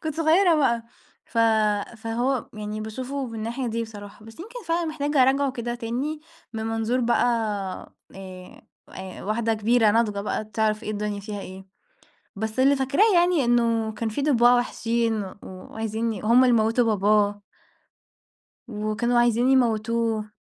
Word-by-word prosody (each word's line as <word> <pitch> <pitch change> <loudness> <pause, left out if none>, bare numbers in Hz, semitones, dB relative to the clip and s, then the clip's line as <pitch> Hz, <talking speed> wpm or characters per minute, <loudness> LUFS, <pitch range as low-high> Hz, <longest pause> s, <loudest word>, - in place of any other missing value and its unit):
كنت 310 -2 -3
صغيرة 330 +3 +4
بقى 245 -6 +2 0.4
ف 230 - -5 0.6
فهو 240 +3 -2
يعني 210 0 -5
باشوفه 255 +5 -5
من 230 - -9
الناحية 235 +4 -4
دي 230 0 -2
بصراحة، 205 -1 -10
بس 225 +6 -13
يمكن 460 +5 -9
فعلًا 335 +1 0
محتاجة 295 -3 +1
أراجعه 270 +1 +2
كده 240 -1 -4
تاني 255 +7 -4 0.3
من 220 0 -4
منظور 225 +3 -1
بقى 240 0 +2 0.9
آآ 185 -1 -11 0.3
آآ 190 -1 -9
واحدة 225 +2 0
كبيرة 220 0 +3
ناضجة 210 -2 +1
بقى 210 +1 -3
تعرَف 215 0 -1
إيه 215 - -4
الدنيا 210 -1 -3
فيها 205 0 -6
إيه. 190 0 -10 0.7
بس 220 +4 -4
اللي 275 +2 +5
فاكراه 280 +11 +2
يعني 345 -6 +3
إنه 230 -2 +1
كان 220 +1 -3
فيه 220 - -3
ضباع 245 -4 +5
وحشين 230 -2 -1
و 190 - -9
وعايزين 220 +4 -4
ي 200 - -7
هُم 235 +4 +5
اللي 245 -2 +4
موتوا 225 +2 +2
باباه. 205 +1 +2 1.3
وكانوا 215 +2 -1
عايزين 240 +1 +3
يموتوه. 230 -3 +1
230 Hz, 150 wpm, -24 LUFS, 215-255 Hz, 1.3 s, اللي